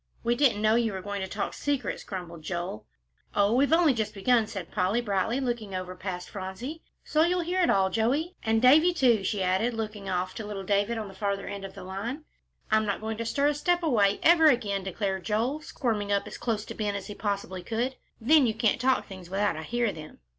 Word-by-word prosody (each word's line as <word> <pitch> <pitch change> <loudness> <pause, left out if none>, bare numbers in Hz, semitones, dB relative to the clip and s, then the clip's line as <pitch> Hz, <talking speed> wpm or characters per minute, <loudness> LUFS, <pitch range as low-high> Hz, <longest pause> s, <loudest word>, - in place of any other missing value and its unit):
"We 235 0 +2
didn't 240 -5 +2
know 215 0 +4
you 230 -2 +2
were 190 - -4
going 205 0 -4
to 190 - -3
talk 200 +2 -3
secrets," 285 -2 -2
grumbled 175 -4 -7
Joel. 170 - -5 0.5
"Oh, 205 +1 +3
we've 275 +4 +3
only 325 -3 +5
just 220 -3 -3
begun," 225 +2 +3
said 195 -6 -7
Polly, 190 +3 +1
brightly, 220 +2 0
looking 235 -7 -3
over 185 0 -5
past 180 -1 -5
Phronsie, 210 +11 -6 0.2
"so 310 - +1
you'll 355 +2 +3
hear 360 +2 0
it 345 - +3
all, 190 -1 +3
Joey; 275 - 0
and 225 +1 +1
Davie, 315 +7 +6
too," 240 - +3
she 195 0 -1
added, 190 +6 +1
looking 210 -3 -5
off 185 0 -1
to 220 - -6
little 205 -2 -5
David 205 +4 +1
on 215 -2 -4
the 195 - -11
farther 200 0 -2
end 200 0 -6
of 195 0 -9
the 195 - -9
line. 215 +11 -5 0.5
"I'm 215 0 +3
not 200 - -1
going 220 0 -4
to 230 - -3
stir 280 +5 +2
a - - +1
step 350 +4 +1
away 210 -10 +3
ever 325 -1 +7
again," 205 -8 +2
declared 190 0 -2
Joel, 235 +8 0
squirming 220 -9 -2
up 200 0 +1
as - - -8
close 220 -3 -1
to - - -7
Ben 210 -2 -2
as 195 -1 -5
he 205 - -7
possibly 200 -3 -3
could, 235 +7 -2 0.2
"then 275 +3 +5
you 220 - -1
can't 220 +1 +1
talk 260 0 +2
things 185 -3 -10
without 200 +2 0
I 155 - -5
hear 235 +6 0
them." 155 -1 -10
215 Hz, 225 wpm, -28 LUFS, 195-245 Hz, 0.5 s, ever